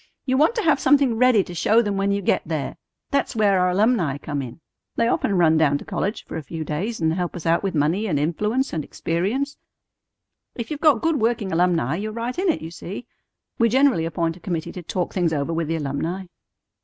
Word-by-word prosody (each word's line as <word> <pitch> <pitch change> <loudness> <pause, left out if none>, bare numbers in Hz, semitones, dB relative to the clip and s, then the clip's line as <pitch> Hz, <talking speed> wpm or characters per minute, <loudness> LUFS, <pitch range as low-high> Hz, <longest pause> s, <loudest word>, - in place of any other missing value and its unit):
You 260 - +1
want 310 - +3
to 450 - 0
have 305 -4 +3
something 270 -3 +4
ready 245 -3 +4
to 175 - -9
show 215 +7 +3
them 205 -2 -1
when 195 0 +1
you 200 0 -1
get - - +2
them - - -17
there. 150 -5 -3 0.3
That's 280 -2 0
where 205 -3 +3
our 180 0 +3
alumni 185 - +2
come 145 0 -4
in. 125 +1 -8 0.4
They 230 - +2
often 200 -4 +1
run 160 -2 +4
down 145 -3 +3
to - - -11
college 205 +4 -3
for - - -6
a - - -4
few 160 +3 -6
days 180 +10 -3
and 160 -1 +1
help 175 0 -3
us 175 - -7
out 165 +1 +3
with 195 -3 -2
money 165 +9 +1
and 155 -7 0
influence 210 - 0
and 160 -2 -2
experience. 210 - -2 1.0
If 235 +4 -5
you've 300 0 -4
got 300 -8 +4
good 325 -5 +1
working 220 -4 0
alumni, 165 -4 +1
you're 215 +3 -4
right 235 +7 -3
in 380 0 +1
it, 315 - 0
you 165 - -6
see. 195 +7 -7 0.5
We 230 0 +4
generally 260 -8 +3
appoint 165 0 -1
a - - -15
committee 170 -4 -3
to 180 - -7
talk 175 +1 -3
things 175 -4 +1
over 145 +2 -1
with 165 -1 -1
the 165 - -1
alumni." 160 +5 -3
185 Hz, 230 wpm, -23 LUFS, 160-235 Hz, 1.0 s, something